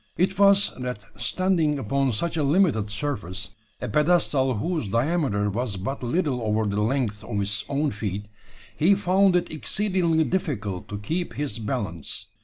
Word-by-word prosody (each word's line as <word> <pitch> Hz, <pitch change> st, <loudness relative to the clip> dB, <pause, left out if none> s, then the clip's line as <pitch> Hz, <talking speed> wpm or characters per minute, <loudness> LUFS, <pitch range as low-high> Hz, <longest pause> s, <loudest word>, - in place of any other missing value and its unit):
It 190 Hz, +2 st, +1 dB
was, 200 Hz, 0 st, +6 dB
that, 125 Hz, -5 st, -4 dB, 0.2 s
standing 175 Hz, -6 st, +1 dB
upon 135 Hz, +2 st, 0 dB
such 165 Hz, +11 st, -1 dB
a 160 Hz, -, 0 dB
limited 145 Hz, -, +2 dB
surface 105 Hz, -5 st, -3 dB, 0.3 s
a -, -, -4 dB
pedestal 150 Hz, -5 st, +2 dB
whose 155 Hz, -, -2 dB
diameter 115 Hz, -, +1 dB
was 115 Hz, 0 st, -2 dB
but 105 Hz, +9 st, -4 dB
little 130 Hz, 0 st, 0 dB
over 110 Hz, 0 st, +1 dB
the 105 Hz, 0 st, 0 dB
length 110 Hz, -3 st, 0 dB
of 105 Hz, -2 st, -3 dB
his 100 Hz, 0 st, 0 dB
own 145 Hz, +1 st, 0 dB
feet 105 Hz, -1 st, -4 dB, 0.5 s
he 185 Hz, +6 st, +4 dB
found 190 Hz, 0 st, +3 dB
it 175 Hz, -2 st, 0 dB
exceedingly 175 Hz, -1 st, +1 dB
difficult 120 Hz, -, -2 dB
to 105 Hz, -, -5 dB
keep 165 Hz, -, -3 dB
his 145 Hz, -4 st, -2 dB
balance. 105 Hz, -, -3 dB
135 Hz, 155 wpm, -25 LUFS, 105-170 Hz, 0.5 s, was